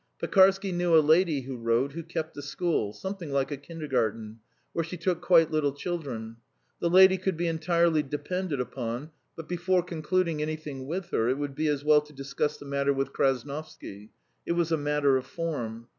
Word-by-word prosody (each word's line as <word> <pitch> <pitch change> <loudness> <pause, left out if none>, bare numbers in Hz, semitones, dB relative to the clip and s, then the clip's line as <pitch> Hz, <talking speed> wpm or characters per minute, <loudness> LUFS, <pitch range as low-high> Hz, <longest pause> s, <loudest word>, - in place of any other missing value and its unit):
Pekarsky 195 0 +4
knew 175 -2 +3
a - - +9
lady, 155 -1 +3
he 135 +1 -8
wrote, 120 +2 0
who 165 +4 -6
kept 160 -1 -5
a 145 - -6
school, 145 - -1
something 190 - -6
like 140 +1 0
a - - -1
kindergarten, 120 -8 -3 0.3
where 165 - 0
she 170 +3 -6
took 175 +1 -1
quite 165 -3 +5
little 150 -3 +1
children. 140 -9 -5 0.4
The 170 - +1
lady 190 +1 +7
could 185 -2 -1
be 175 - -1
entirely 165 -1 +2
depended 150 +3 -3
upon, 125 +3 -4 0.2
but 165 - -8
before 180 +1 +1
concluding 170 -1 -1
anything 150 -4 -5
with 175 +3 -4
her 115 +2 +1
it 130 - +1
would 145 -1 -3
be 155 +3 -1
as 145 -2 0
well 150 0 +5
to 150 0 -16
discuss 140 +2 -2
the - - -12
matter 140 0 +1
with 135 0 -2
Krasnovsky 135 -6 -3 0.3
it - - -1
was 170 -1 0
a - - +4
matter 145 -2 +2
of 130 0 -5
form. 120 -9 -4
150 Hz, 190 wpm, -28 LUFS, 135-170 Hz, 0.4 s, a